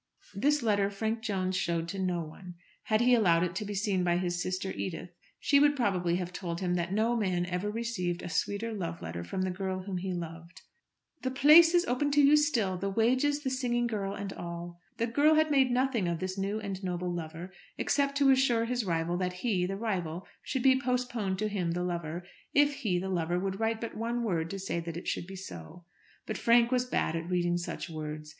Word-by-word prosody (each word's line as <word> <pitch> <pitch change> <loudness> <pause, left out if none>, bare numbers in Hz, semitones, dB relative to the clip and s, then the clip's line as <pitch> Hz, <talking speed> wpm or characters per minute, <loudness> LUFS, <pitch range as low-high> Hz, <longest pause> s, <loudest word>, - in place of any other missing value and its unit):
This 285 +7 +1
letter 205 -3 +2
Frank 220 +3 -2
Jones 190 -4 -1
showed 170 -3 -1
to 195 - -4
no 180 -2 0
one. 175 +3 -10 0.3
Had 215 0 +2
he 250 +1 +5
allowed 175 -8 +4
it 175 -1 -1
to 215 - -2
be 205 0 -4
seen 195 -2 0
by 175 -1 +2
his 175 -1 -1
sister 185 +1 -2
Edith, 175 -1 -5 0.3
she 280 - +4
would 290 0 +5
probably 185 -9 +1
have 180 0 -3
told 170 -2 -4
him 180 -2 0
that 175 0 -1
no 220 +4 +2
man 185 -6 0
ever 180 +3 -2
received 210 -6 -2
a - - -4
sweeter 205 +6 -1
love 170 -5 -4
letter 85 +1 -5
from 185 - -3
the 185 - -1
girl 185 0 -3
whom 190 -1 -4
he 190 +1 -3
loved. 170 0 -7 0.6
"The 260 - -1
place 305 +6 +7
is 350 +1 +4
open 285 0 0
to 295 - +4
you 285 +2 +7
still, 240 -11 +2
the 195 - -1
wages, 255 +8 +2
the 265 - -1
singing 240 -2 0
girl, 200 -4 -2
and 200 -1 -5
all." 170 0 -7 0.2
The 230 - +1
girl 290 +7 +4
had 310 0 +3
made 270 -2 +4
nothing 245 -5 +1
of 170 -1 -1
this 185 +2 -3
new 200 +2 -2
and 195 -2 -5
noble 180 -1 -2
lover, 170 +2 -6 0.3
except 280 -1 +1
to 280 -1 +5
assure 255 -3 +3
his 245 0 -1
rival 170 -1 -1
that 180 0 -1
he, 190 -7 +1
the 195 +1 -3
rival, 185 -6 -3 0.2
should 260 -3 -3
be 260 0 +5
postponed 245 -6 -1
to 215 +2 0
him, 185 -5 -1
the 180 +1 -2
lover, 170 -1 -3 0.3
if 290 0 +5
he, 210 -10 0
the 185 +2 -2
lover, 175 -1 0
would 195 +1 -3
write 225 0 0
but 230 - -5
one 235 +2 -2
word 165 -7 -1
to 195 - -4
say 190 -3 -3
that 170 0 -5
it 175 - -7
should 175 - -2
be 190 - -8
so. 170 - -9 0.4
But - - -4
Frank 235 0 +4
was 250 -1 +2
bad 170 -9 0
at 165 +1 -4
reading 175 -1 +1
such 175 - -5
words. 155 -2 -6
195 Hz, 220 wpm, -30 LUFS, 175-235 Hz, 0.6 s, place